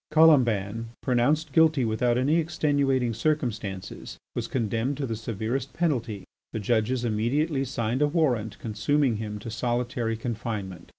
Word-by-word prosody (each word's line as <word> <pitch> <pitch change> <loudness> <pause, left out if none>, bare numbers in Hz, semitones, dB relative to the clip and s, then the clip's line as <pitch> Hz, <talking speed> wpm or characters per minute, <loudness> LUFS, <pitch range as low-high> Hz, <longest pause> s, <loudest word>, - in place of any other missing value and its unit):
Colomban, 115 -9 +4 0.2
pronounced 140 +4 +1
guilty 155 -5 +4
without 120 +2 +1
any 140 +6 +3
extenuating 140 -6 +1
circumstances, 110 -8 -3 0.2
was - - -3
condemned 115 +3 -1
to 140 - -2
the 115 -3 -3
severest 115 +4 -3
penalty. 120 - -1 0.3
The 110 - -2
judges 120 +3 +1
immediately 135 +7 +1
signed 120 +1 -1
a 150 - +5
warrant 125 - 0
consuming 120 +3 +1
him 105 -1 -4
to 105 +2 -7
solitary 120 0 -1
confinement. 105 -6 -5
120 Hz, 130 wpm, -26 LUFS, 110-140 Hz, 0.3 s, a